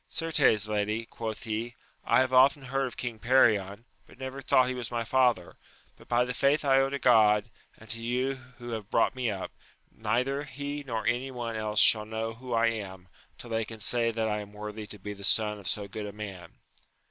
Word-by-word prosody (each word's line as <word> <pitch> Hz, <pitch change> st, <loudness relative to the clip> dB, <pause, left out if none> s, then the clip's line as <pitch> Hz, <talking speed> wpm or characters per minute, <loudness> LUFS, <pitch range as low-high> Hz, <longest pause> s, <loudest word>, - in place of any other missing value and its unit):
Certes, 145 Hz, -, +2 dB
lady, 105 Hz, +2 st, -1 dB
quoth 110 Hz, -1 st, -6 dB
he, 115 Hz, +2 st, -4 dB, 0.3 s
I -, -, +4 dB
have 130 Hz, 0 st, -1 dB
often 135 Hz, +2 st, +5 dB
heard 135 Hz, +1 st, -1 dB
of 125 Hz, -, -10 dB
King 120 Hz, -3 st, -4 dB
Perion, 110 Hz, -4 st, +2 dB, 0.2 s
but -, -, -17 dB
never 130 Hz, +1 st, -6 dB
thought 130 Hz, 0 st, +3 dB
her 130 Hz, -, -1 dB
was 120 Hz, -2 st, -4 dB
my 120 Hz, -1 st, -2 dB
father; 120 Hz, -6 st, +1 dB, 0.4 s
but -, -, -18 dB
by 120 Hz, +1 st, +2 dB
the 125 Hz, -, -3 dB
faith 140 Hz, +4 st, +2 dB
I 135 Hz, -1 st, +5 dB
owe 135 Hz, 0 st, +2 dB
to 140 Hz, -, -2 dB
God, 110 Hz, -4 st, +4 dB, 0.3 s
and 110 Hz, -, -16 dB
to 115 Hz, -, -4 dB
you 125 Hz, +3 st, 0 dB, 0.2 s
who 120 Hz, -1 st, -8 dB
have 110 Hz, -3 st, -5 dB
brought 115 Hz, -, +2 dB
me 130 Hz, -3 st, -1 dB
up, 95 Hz, -3 st, -4 dB, 0.4 s
neither 125 Hz, +6 st, -1 dB
he 145 Hz, +2 st, -5 dB
nor 115 Hz, -5 st, -4 dB
any 125 Hz, +4 st, 0 dB
one 120 Hz, -3 st, -5 dB
else 105 Hz, -1 st, -1 dB
shall 105 Hz, -1 st, +6 dB
know 110 Hz, +1 st, -4 dB
who 125 Hz, +2 st, -10 dB
I 115 Hz, 0 st, +3 dB
am, 95 Hz, -5 st, -7 dB, 0.3 s
tiU -, -, -10 dB
they 115 Hz, 0 st, 0 dB
can 110 Hz, 0 st, -9 dB
say 115 Hz, +2 st, +3 dB
that 110 Hz, -1 st, -1 dB
I 105 Hz, -1 st, -1 dB
am 105 Hz, 0 st, -9 dB
worthy 105 Hz, 0 st, -7 dB
to 105 Hz, -, -8 dB
be 105 Hz, +1 st, -7 dB
the 100 Hz, 0 st, -12 dB
son 105 Hz, +1 st, +2 dB
of 100 Hz, -, -9 dB
so 100 Hz, +3 st, -2 dB
good 105 Hz, +1 st, -6 dB
a -, -, -6 dB
man. 95 Hz, -5 st, -8 dB
115 Hz, 220 wpm, -28 LUFS, 105-130 Hz, 0.4 s, shall